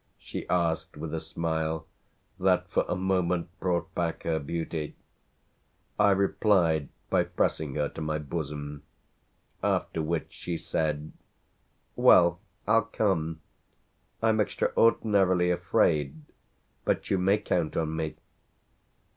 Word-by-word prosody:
she - - -7
asked 85 -4 0
with 80 +1 -5
a 80 - -1
smile 80 0 -2 0.5
that - - +2
for - - +2
a - - -1
moment 90 -2 0
brought 90 0 -1
back 85 -1 -2
her 80 -1 0
beauty. 80 +1 -4 1.0
I 100 - +6
replied 95 -6 +2 0.2
by - - +3
pressing 75 -4 -1
her 75 -1 +1
to - - -8
my 75 0 -1
bosom; 75 -1 -5 0.8
after 80 - 0
which 80 +1 -2
she 85 -1 -4
said: 75 -2 -2 0.8
"Well, 85 -1 +6 0.3
I'll 115 +1 +4
come. 80 -8 -1 0.8
I'm 110 -1 +3
extraordinarily 95 -5 +3
afraid, 75 -3 +1 0.6
but - - -1
you 95 - +3
may 95 +3 +3
count 85 -6 -1
on 80 -1 -1
me." 80 -1 -3
85 Hz, 115 wpm, -28 LUFS, 80-95 Hz, 1.0 s, I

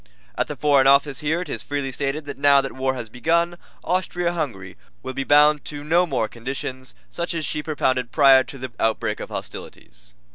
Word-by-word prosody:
At - - -1
the - - -5
Foreign 140 -3 +3
Office 140 0 +4
here 155 +4 0
it 180 - -6
is - - -4
freely 140 -2 -3
stated 140 +3 -3
that 145 -1 -8
now 140 0 +6
that 135 0 -3
war 130 0 -1
has 120 -3 -6
begun 170 +9 0 0.3
Austria 175 -1 -1
Hungary 115 - -4 0.3
will 130 - -5
be 135 - -2
bound 150 +1 +5
to 145 -1 -6
no 170 +4 +3
more 125 -7 0
conditions 130 +2 -6 0.2
such 170 0 -3
as 160 -2 -2
she 150 - -2
propounded 130 -5 -1
prior 135 -3 +6
to 140 - -10
the 130 -1 -7
outbreak 110 -1 0
of - - -7
hostilities. - - -9
140 Hz, 195 wpm, -22 LUFS, 130-155 Hz, 0.3 s, now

